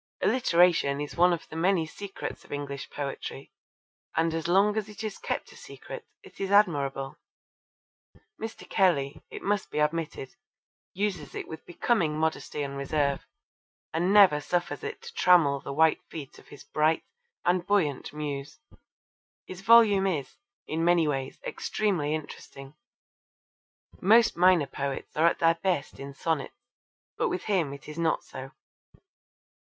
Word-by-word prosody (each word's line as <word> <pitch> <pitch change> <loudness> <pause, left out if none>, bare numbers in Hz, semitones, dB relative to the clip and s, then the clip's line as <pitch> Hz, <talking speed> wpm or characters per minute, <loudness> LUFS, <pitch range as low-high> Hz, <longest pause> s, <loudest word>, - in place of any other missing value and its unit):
Alliteration 175 - +3
is 145 0 -5
one 180 +1 +5
of 170 - -3
the - - -9
many 170 0 +2
secrets 195 +5 -7
of - - -18
English 140 -1 -5
poetry, 140 -1 -6 0.6
and 165 0 +2
as 165 0 -2
long 200 +4 +4
as 215 -1 -2
it 210 +1 -8
is 215 -2 -5
kept - - -4
a - - -15
secret 465 -2 -10 0.2
it - - -16
is 195 - -1
admirable. 140 -9 +2 1.2
Mr. 225 0 -7
Kelly, 150 -7 +1
it - - -8
must 205 0 0
be - - -6
admitted, 150 -3 -1 0.6
uses 185 -7 -2
it - - -5
with 160 - -9
becoming 175 -4 0
modesty 155 -1 -1
and 140 0 -5
reserve 140 0 -1 0.7
and 175 +4 +1
never 195 -8 +7
suffers 150 -3 -2
it - - -6
to - - -9
trammel 160 -6 +4
the 140 - -7
white 160 +3 +3
feet 145 -5 -8
of - - -19
his 145 - -12
bright 155 +1 +1 0.4
and 175 0 +1
buoyant 170 -10 +1
muse. 145 -2 -5 0.9
His 185 0 -9
volume 205 -2 +6
is, 155 -8 -2 0.3
in 160 +1 -2
many 170 -2 +4
ways, 135 -2 -3
extremely 170 -8 -1
interesting. 135 -2 -9 1.3
Most 225 +4 +5
minor 180 -3 +5
poets 140 0 -5
are 160 +2 +4
at - - +2
their 165 0 +3
best 175 -7 -1
in 140 0 -8
sonnets, 160 -3 -2 0.6
but - - +2
with 365 -2 -3
him 180 -9 0
it 140 0 -10
is 150 +2 -7
not 165 -1 +1
so. 130 +1 -9
160 Hz, 150 wpm, -28 LUFS, 145-190 Hz, 1.3 s, never